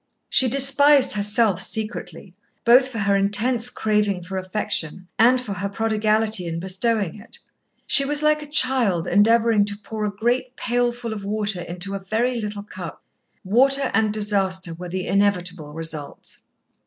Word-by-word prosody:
She 260 -1 +5
despised 275 +1 +5
herself 205 -2 +1
secretly, 215 -3 -3 0.3
both 250 +3 +5
for 255 -3 -8
her 200 -1 0
intense 225 +5 +1
craving 210 -5 -1
for 190 +2 -8
affection 185 -2 -2
and 245 +3 +4
for 235 -5 -6
her 200 +1 -4
prodigality 215 -2 0
in 165 0 -4
bestowing 190 +1 -2
it. 215 - -11 0.5
She 275 - +4
was 295 +2 +1
like 305 0 +2
a 295 - -9
child 255 - +2
endeavouring 225 +2 +3
to 205 0 -2
pour 215 +1 -7
a 210 - -1
great 245 +5 -2
pailful 240 -1 -2
of 205 -2 -8
water 205 -2 -3
into 175 +3 -3
a 195 - -4
very 230 +5 -2
little 210 -1 -6
cup. 210 - -10 0.4
Waste 255 +8 +3 0.2
and 220 -1 +1
disaster 195 -4 0
were 175 +2 -9
the 185 +1 -4
inevitable 180 -6 -1
results. 160 -2 -7
210 Hz, 155 wpm, -21 LUFS, 190-240 Hz, 0.5 s, She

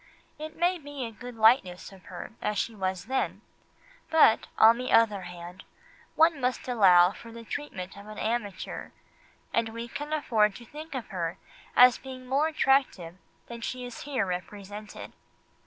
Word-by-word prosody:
It 310 +1 -7
may 355 +1 +1
be 290 -3 -6
a 230 - -6
good 245 +2 -10
likeness 220 -6 +3
of 190 -1 -16
her - - -8
as 210 - -1
she 230 - -1
was 190 -3 -3
then, 260 +3 -2 0.7
but, 310 -9 +5
on 230 +2 +7
the 255 - -3
other 210 -4 +4
hand, 180 +1 -9 0.5
one 320 -3 +4
must 250 +1 -1
allow 185 -7 +6
something 200 - -11
for 230 - -11
the 230 0 -10
treatment 200 -8 -6
of 200 +1 -12
an 215 0 -9
amateur, 215 -4 -3 0.6
and 230 -1 +1
we 230 +1 -6
can 295 +5 -6
afford 220 -9 +2
to 240 - -11
think 305 +4 -9
of 255 - -5
her 170 -3 -3 0.4
as 250 0 +7
being 260 -1 -9
more 275 +5 +2
attractive 270 - +1 0.3
than 235 -1 -9
she 250 +1 -4
is 245 -2 -8
here 265 -8 -1
represented. 205 +3 -7
230 Hz, 170 wpm, -28 LUFS, 195-260 Hz, 0.7 s, on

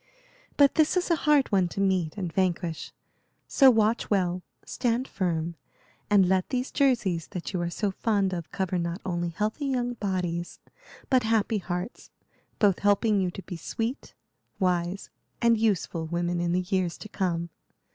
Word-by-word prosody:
But 285 -1 +6
this 315 +3 +3
is 360 0 0
a - - +5
hard 285 -4 +4
one 190 -3 +3
to 175 - -6
meet 190 -4 +1
and 180 -5 -4
vanquish; 175 -3 -1 0.6
so 270 -2 +6
watch 225 -1 +2
well, 185 -3 +1 0.2
stand 245 +1 -1
firm, 170 -3 -2 0.6
and 200 -3 +5
let 185 0 +1
these 255 0 -2
jerseys 225 - +1
that 180 +2 -6
you 180 - -1
are 170 - -1
so 200 +4 -1
fond 200 -2 0
of 170 -3 -5
cover 185 -2 -1
not 170 +2 -3
only 175 -2 -1
healthy 215 - -2
young 245 -2 -1
bodies 180 -5 -3 0.5
but 260 -1 +5
happy 220 -1 +1
hearts, 180 +4 -5 0.5
both 200 -5 +3
helping 205 0 +3
you 185 - 0
to 190 +2 -8
be 175 - -7
sweet, 225 - -4 0.4
wise, 180 0 -1 0.3
and 235 -2 +3
useful 185 -6 0
women 175 +1 -1
in 170 0 0
the 180 +1 +2
years 185 -3 0
to - - -9
come. 170 -4 -2
190 Hz, 165 wpm, -27 LUFS, 175-225 Hz, 0.6 s, But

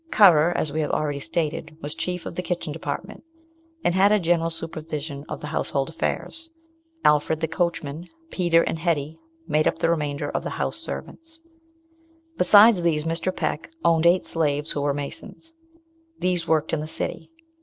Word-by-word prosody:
Currer, 175 - +6
as 145 - -1
we 155 - 0
have 150 - -1
already 145 -2 -1
stated, 155 +1 -3
was 150 0 -4
chief 175 +2 -4
of - - -5
the 180 - -3
kitchen 175 -4 -3
department, 165 +6 -6 0.6
and 175 - +2
had 195 +2 +5
a 210 - +4
general 165 -1 +1
supervision 155 -3 -5
of - - -5
the - - -6
household 140 -1 -1
affairs. 325 - -3 0.6
Alfred 150 +1 +3
the 160 - 0
coachman, 165 -1 -2 0.2
Peter, 170 -2 +3
and 165 - -2
Hetty 160 -2 -1 0.3
made 155 +1 +2
up - - +1
the 165 - +2
remainder 145 -3 -1
of - - -2
the - - -3
house - - -1
servants. 325 0 -7 0.9
Besides 205 - +7
these, 160 -3 +1
Mr. 165 +3 -2
Peck 155 -1 -2 0.2
owned 165 0 +4
eight 175 +1 +4
slaves 150 -1 -1
who 145 - -2
were 140 0 0
masons. 145 - -7 0.6
These 180 - 0
worked 160 -1 +1
in 160 - +1
the 155 - -5
city. 160 - -4
165 Hz, 170 wpm, -24 LUFS, 150-175 Hz, 0.9 s, Besides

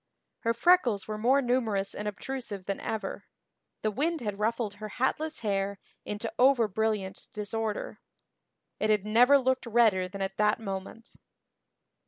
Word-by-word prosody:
Her 230 0 0
freckles 240 - +3
were 215 0 -4
more 265 +5 +3
numerous 225 -6 0
and 210 - -5
obtrusive 210 -2 -5
than 195 0 -2
ever; 210 -3 -4 0.6
the 215 - +1
wind 315 +9 0
had 205 -3 -4
ruffled 225 -1 0
her 215 - -5
hatless 305 +4 -1
hair 200 -2 -1 0.3
into 210 +2 -4
over 250 -3 +5
brilliant 210 -2 -2
disorder; 215 +1 -3 0.8
it 215 - +1
had 210 -2 +2
never 245 +6 +6
looked 260 -2 0
redder 215 -5 +3
than 195 +1 -5
at 195 0 -4
that 210 0 +3
moment. 195 +2 -6
215 Hz, 145 wpm, -29 LUFS, 200-240 Hz, 0.8 s, never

